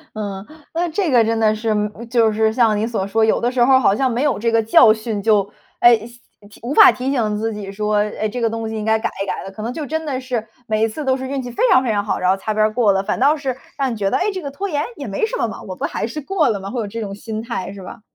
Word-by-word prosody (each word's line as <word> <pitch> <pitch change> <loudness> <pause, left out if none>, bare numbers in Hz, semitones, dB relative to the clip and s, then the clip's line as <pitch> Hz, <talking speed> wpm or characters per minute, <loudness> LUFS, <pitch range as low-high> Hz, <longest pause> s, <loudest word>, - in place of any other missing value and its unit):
嗯， 200 -2 -5 0.3
那 345 +1 0
这 360 +2 -1
个 240 -4 +5
真 225 0 0
的 215 -1 +3
是 220 +1 -4
嗯 210 +2 -2
就 230 -2 +3
是 220 0 +1
像 225 -3 +3
你 210 - 0
所 220 -4 -2
说， 220 +2 +2
有 220 - +2
的 240 - +1
时 250 -1 +2
候 265 +2 +5
儿 260 - +6
好 200 - +3
像 260 +4 +1
没 240 +2 -1
有 275 -7 +1
这 230 - +1
个 230 0 +3
教 220 0 +6
训， 220 -1 -4
就， 205 -2 +3 0.3
哎， 240 -1 +7
提 220 -2 -15
无 265 +5 -2
法 400 -4 +9
提 260 +2 -3
醒 215 -5 0
自 225 +1 -2
己 205 -2 -6
说： 210 +1 -1 0.2
“诶， 215 - 0
这 245 +3 -5
个 230 - +1
东 225 0 -4
西 220 - -5
应 215 -1 -3
该 220 0 +2
改 - - -1
一 - - -4
改 - - -4
的”。 195 - -8
可 215 - -7
能 235 - -3
就 300 +2 -5
真 320 +3 -3
的 270 -4 -3
是 250 -4 -3 0.2
每 215 -1 0
一 225 - +3
次 290 +7 -6
都 260 -1 +2
是 260 0 -6
运 275 -1 -2
气 250 - -6
非 - - -2
常 265 -8 +5
非 235 - 0
常 205 -1 0
好， 205 - -1
然 180 - 0
后 190 - +3
擦 215 +2 -3
边 215 0 +3
儿 215 - -3
过 220 -3 +3
了， 195 0 +1
反 215 - -2
倒 285 +4 +4
是 265 -4 -3 0.2
让 270 -3 0
你 230 - -5
觉 195 -2 -1
得， - - +1
哎， 405 +3 0
这 375 -2 -5
个 280 - -5
拖 390 +8 -4
延 295 -3 -1
也 - - -6
没 450 - -2
什 - - -4
么 - - 0
嘛， - - -8
我 - - -7
不 - - -5
还 - - -2
是 305 - -5
过 330 +2 +1
了 215 -4 0
吗？ 195 0 -7
会 245 0 -3
有 210 - -4
这 230 +3 -6
种 200 -3 -5
心 215 +1 -6
态， 195 -5 -5
是 200 - -10
吧？ 205 +5 -10
225 Hz, 345 characters per minute, -19 LUFS, 215-260 Hz, 0.3 s, 法